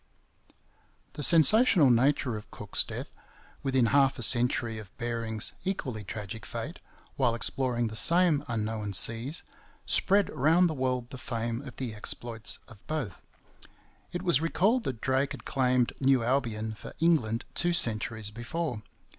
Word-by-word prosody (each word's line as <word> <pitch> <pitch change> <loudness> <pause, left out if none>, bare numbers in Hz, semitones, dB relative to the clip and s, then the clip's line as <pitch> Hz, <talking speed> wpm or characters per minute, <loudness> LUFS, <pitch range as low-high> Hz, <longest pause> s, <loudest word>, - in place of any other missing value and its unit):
The - - -7
sensational 170 - +5
nature 125 0 +1
of 105 - -9
Cook's - - 0
death, - - -7 0.5
within 130 -3 +1
half 135 -1 +3
a 120 - 0
century 120 -1 +5
of 105 -3 -11
Bering's 115 -2 -3
equally 130 - -4
tragic 105 +1 -7
fate, - - -6 0.4
while 115 - +1
exploring 120 +1 -1
the 110 -1 -5
same 170 +2 +6
unknown 110 -3 -3
seas, 115 - +1 0.4
spread 200 +1 +2
round 160 +5 +3
the 160 - -3
world 130 -3 -3
the 130 - -9
fame 115 -1 -4
of 125 - -10
the 125 -4 -5
exploits 115 +1 -4
of 105 -3 -16
both. 150 -11 -4 0.9
It 175 +1 -5
was 170 -6 +2
recalled 205 +9 +1
that 115 -4 -4
Drake 135 +1 0
had - - -11
claimed 125 -2 +1
New 135 -2 +3
Albion 115 -4 -1
for 105 - -11
England 140 -9 +1
two 175 - 0
centuries 110 -7 +1
before. 120 +3 -5
125 Hz, 145 wpm, -28 LUFS, 115-145 Hz, 0.9 s, same